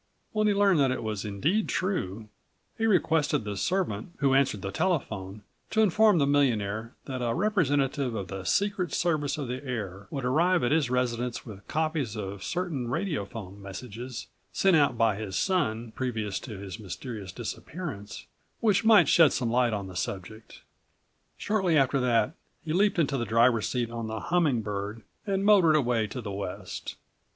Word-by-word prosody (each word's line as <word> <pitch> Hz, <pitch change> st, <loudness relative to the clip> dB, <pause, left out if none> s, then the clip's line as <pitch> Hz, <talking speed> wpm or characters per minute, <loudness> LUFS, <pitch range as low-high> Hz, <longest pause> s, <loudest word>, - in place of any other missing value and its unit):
When 215 Hz, 0 st, +1 dB
he 210 Hz, -, +4 dB
learned 200 Hz, -4 st, +4 dB
that 135 Hz, -2 st, +4 dB
it 130 Hz, -, -2 dB
was 110 Hz, -1 st, -3 dB
indeed 150 Hz, -, 0 dB
true, 110 Hz, -, -2 dB, 0.5 s
he 225 Hz, -, 0 dB
requested 160 Hz, -, +2 dB
the 105 Hz, -1 st, -4 dB
servant 170 Hz, -, -1 dB
who 140 Hz, -2 st, +2 dB
answered 135 Hz, -8 st, +2 dB
the 95 Hz, -, -3 dB
telephone 105 Hz, -, -2 dB, 0.3 s
to 220 Hz, -, +2 dB
inform 215 Hz, 0 st, +4 dB
the 145 Hz, -, +3 dB
millionaire 115 Hz, -6 st, +1 dB
that 130 Hz, -2 st, -4 dB
a 120 Hz, -1 st, 0 dB
representative 145 Hz, -, +1 dB
of 100 Hz, -3 st, -4 dB
the 95 Hz, -1 st, -6 dB
Secret 190 Hz, -, 0 dB
Service 155 Hz, -4 st, 0 dB
of 145 Hz, -4 st, -3 dB
the 125 Hz, +3 st, -4 dB
Air 100 Hz, -7 st, -5 dB
would 135 Hz, -3 st, -4 dB
arrive 170 Hz, +7 st, +3 dB
at 120 Hz, -, +1 dB
his 150 Hz, -4 st, +2 dB
residence 125 Hz, -1 st, -1 dB
with87 100 Hz, -4 st, -11 dB
copies 155 Hz, -7 st, -1 dB
of 100 Hz, -1 st, -5 dB
certain 170 Hz, -, -2 dB
radiophone 115 Hz, -, -4 dB
messages 115 Hz, +5 st, -7 dB, 0.3 s
sent 190 Hz, -2 st, +3 dB
out 145 Hz, -6 st, +3 dB
by 115 Hz, -3 st, +2 dB
his 100 Hz, -3 st, -5 dB
son 120 Hz, -, 0 dB
previous 110 Hz, -6 st, -3 dB
to 110 Hz, -6 st, -8 dB
his 100 Hz, +1 st, -7 dB
mysterious 100 Hz, +1 st, -7 dB
disappearance, 115 Hz, -, -6 dB, 0.3 s
which 215 Hz, -2 st, +3 dB
might 220 Hz, -2 st, +7 dB
shed 165 Hz, -5 st, +6 dB
some 120 Hz, -3 st, -1 dB
light 120 Hz, 0 st, +3 dB
on 100 Hz, -2 st, -2 dB
the 95 Hz, -1 st, -9 dB
subject. 95 Hz, +4 st, -6 dB, 0.7 s
Shortly 190 Hz, -6 st, +1 dB
after 135 Hz, -1 st, +3 dB
that 125 Hz, +2 st, +2 dB, 0.3 s
he 155 Hz, -, -2 dB
leaped 200 Hz, +3 st, +3 dB
into 145 Hz, -4 st, +1 dB
the 120 Hz, -, -1 dB
driver's 115 Hz, 0 st, +3 dB
seat 120 Hz, -2 st, -1 dB
on 115 Hz, -1 st, -4 dB
the 110 Hz, 0 st, -4 dB
Humming 145 Hz, -, +1 dB
Bird 105 Hz, +2 st, -4 dB, 0.2 s
and 195 Hz, 0 st, 0 dB
motored 190 Hz, -7 st, +6 dB
away 120 Hz, -6 st, +2 dB
to 125 Hz, +4 st, -6 dB
the 105 Hz, -3 st, -5 dB
west. 95 Hz, -1 st, -5 dB
125 Hz, 170 wpm, -28 LUFS, 105-160 Hz, 0.7 s, might